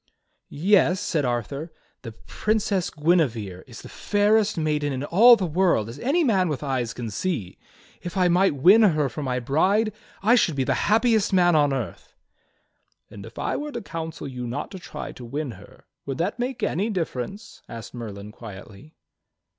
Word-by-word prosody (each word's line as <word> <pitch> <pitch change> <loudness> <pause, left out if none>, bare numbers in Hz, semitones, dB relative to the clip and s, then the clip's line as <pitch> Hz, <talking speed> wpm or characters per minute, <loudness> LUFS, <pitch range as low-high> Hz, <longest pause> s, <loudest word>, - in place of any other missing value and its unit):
"Yes," 180 +2 +3
said 150 -4 -1
Arthur, 130 +7 -3 0.3
"the 115 - -8
Princess 200 - -1
Guinevere 125 - 0
is - - -11
the - - -9
fairest 210 0 +1
maiden 150 -2 0
in 130 0 -3
all 225 +11 +7
the 195 - -2
world, 170 - +1
as 120 +5 -9
any 305 - +1
man 190 - +2
with 150 -1 -3
eyes 130 -4 -1
can 115 -2 -6
see. 120 - -3 0.4
If 175 +2 -6
I 180 -1 +4
might 180 -1 +3
win 185 +11 +6
her 155 -9 +3
for 150 - -6
my 125 -3 -1
bride 190 - +1 0.3
I 225 +4 +5
should 185 - +3
be 135 - 0
the - - +1 0.2
happiest 220 -2 +3
man 175 -2 +4
on 145 -2 +3
earth." 120 -10 -5 1.0
"And 100 -1 -10
if - - -15
I - - -2
were 295 +1 -5
to - - -4
counsel 160 -4 -6
you 125 -2 -6
not 135 +5 -5
to 190 - -8
try - - -7
to 125 - -11
win 140 +3 -4
her, - - -15 0.2
would 135 - -3
that 180 +8 -2
make 250 -1 -3
any 200 +7 0
difference?" 185 - -5
asked 115 -2 -9
Merlin 105 -4 -8
quietly. 105 +6 -12
155 Hz, 180 wpm, -24 LUFS, 125-195 Hz, 1.0 s, all